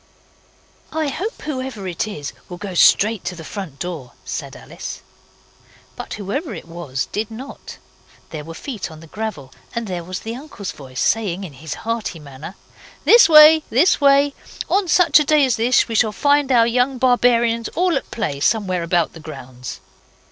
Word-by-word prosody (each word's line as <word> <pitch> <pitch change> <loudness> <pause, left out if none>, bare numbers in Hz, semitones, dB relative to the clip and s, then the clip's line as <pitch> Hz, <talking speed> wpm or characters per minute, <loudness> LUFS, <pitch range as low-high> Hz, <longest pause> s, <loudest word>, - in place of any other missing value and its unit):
'I 315 -2 -1
hope 395 - -5
whoever 260 -8 -4
it 180 +4 -2
is 150 -9 -6 0.2
will 175 - -7
go 190 +1 -6
straight 210 +4 +4
to 180 - -3
the 165 - -9
front 185 -7 -7
door,' 160 -8 -6
said - - -5
Alice. - - -8 0.9
But - - -6
whoever 215 - -4
it 165 - -10
was 165 -6 -4
did 215 +1 -2
not. 245 +5 -9 0.5
There 155 -2 -6
were 165 +2 -9
feet 225 - -6
on 160 -1 -12
the 165 - -13
gravel, 165 -7 -6 0.2
and 235 0 -2
there 180 -4 -4
was 185 +2 -6
the 225 +1 -5
uncle's 250 -7 -7
voice, 130 -3 -9
saying 200 - 0
in 170 -6 -8
his 150 +4 -7
hearty 230 -6 -2
manner 150 +4 -10 0.5
'This 470 -5 +7
way. 310 0 +9
This 290 +7 +3
way. 280 0 +5 0.4
On 390 -1 +2
such 330 -3 +5
a - - +2
day 300 -1 +4
as 255 -3 +1
this 240 +2 +3
we 230 - -5
shall 220 0 +3
find 285 +5 +2
our 235 -2 +5
young 250 +3 +1
barbarians 240 -2 +3
all 355 0 +2
at 270 - -3
play 155 -12 -3
somewhere 185 +1 +1
about 170 -1 0
the 165 - -11
grounds. 125 -5 -9
220 Hz, 175 wpm, -20 LUFS, 170-265 Hz, 0.9 s, way